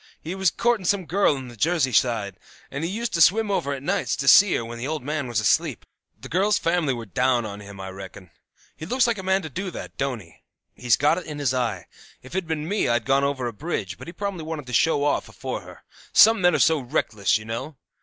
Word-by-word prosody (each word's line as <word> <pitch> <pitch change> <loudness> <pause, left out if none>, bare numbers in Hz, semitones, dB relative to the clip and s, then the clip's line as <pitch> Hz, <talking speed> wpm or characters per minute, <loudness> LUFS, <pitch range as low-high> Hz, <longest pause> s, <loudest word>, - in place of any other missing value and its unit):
He 165 - -6
was 190 -1 +2
courting 235 -2 0
some 195 -2 +1
girl 185 -3 +2
on 130 -2 -7
the 120 - -11
Jersey 155 +1 +1
side, 105 -4 +1 0.3
and 140 +3 -4
he 165 - -1
used 230 +4 -3
to 165 - +1
swim 210 +5 +4
over 140 -7 -1
at 135 -1 -5
nights 195 +6 0
to 140 - -4
see 200 +6 +7
her 115 - -2
when 115 0 -8
the 125 - -3
old 155 -2 -3
man 150 -1 -3
was 120 -3 0
asleep. 105 -3 +1 0.3
The - - -9
girl's 195 +5 +2
family 165 -4 +1
were 120 -3 -4
down 125 +3 +1
on 100 -1 -7
him, 100 -1 -11
I 95 0 -6
reckon. 95 -2 -10 0.4
He 160 - -8
looks 255 +5 +2
like 230 -3 0
a - - -3
man 190 0 +1
to 160 - -6
do 190 +8 -4
that, - - -8
don't 135 -4 -2
he? 85 -3 -18 0.4
He's 120 -4 +2
got 150 +5 +2
it 175 - -11
in 150 -1 -6
his 140 -3 0
eye. 115 -8 -2 0.4
If 130 - -12
it'd 190 -2 -2
been 155 -1 -3
me 205 +3 0
I'd 120 -1 +1
gone 135 +1 +2
over 140 -2 -1
on 120 - -2
a - - -21
bridge; 100 - -4
but - - -10
he - - -6
probably 200 -1 -4
wanted 155 -3 -5
to 125 - -8
show 145 +3 +3
off 145 - 0
afore - - -5
her; - - -14 0.3
some 225 -2 +6
men 175 -2 +4
are - - +3
so 160 -2 +3
reckless, 115 -6 0
you 110 - -10
know. 115 +6 -5
145 Hz, 255 wpm, -24 LUFS, 120-175 Hz, 0.4 s, see